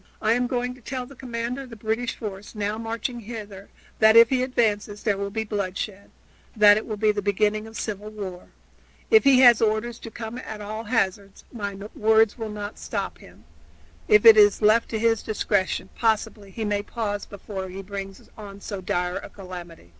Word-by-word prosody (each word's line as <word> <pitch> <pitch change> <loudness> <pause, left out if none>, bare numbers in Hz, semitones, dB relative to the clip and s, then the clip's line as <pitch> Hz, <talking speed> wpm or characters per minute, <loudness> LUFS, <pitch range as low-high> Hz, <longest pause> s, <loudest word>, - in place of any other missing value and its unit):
"I 220 - +1
am 245 +1 +1
going 245 0 -2
to 255 - -17
tell 255 +1 -5
the 275 - -13
commander 245 0 -4
of 265 - -10
the 230 - -9
British 225 +2 -2
force, 210 0 -8
now 210 +1 -2
marching 230 +2 -4
hither, 210 -3 -9 0.3
that 220 0 +6
if 230 0 +9
he 255 -1 +2
advances 215 -5 0
there 210 -3 +2
will 200 0 -3
be 220 +2 -2
bloodshed 200 -1 -4 0.5
that 210 -1 +7
it 215 - -3
will 215 - -4
be 215 0 +3
the 205 -1 -3
beginning 210 +2 0
of 220 0 -9
civil 210 -1 -4
war. 195 -4 -7 0.6
If 440 -1 +6
he 265 -2 +6
has 240 -3 +7
orders 225 +2 0
to 230 - -8
come 225 +2 -7
at 220 -4 -7
all 215 +2 -6
hazards, 200 -3 -1
my 200 -4 -4 0.2
words 220 0 +3
will 225 -3 -5
not 210 0 -6
stop - - -4
him; - - -17 0.6
if 425 +1 +5
it 450 -1 +10
is 415 - +5
left 215 +2 +4
to 225 - -2
his 225 0 +2
discretion, 205 -3 -1
possibly 215 -2 -1
he 220 +3 -5
may 205 -1 0
pause 205 -2 -4
before 195 -1 -7
he 190 +2 -7
brings 195 0 -8
on 200 -2 -10
so 200 -1 -6
dire 180 0 -1
a - - -8
calamity." 175 - -10
215 Hz, 195 wpm, -24 LUFS, 200-230 Hz, 0.6 s, it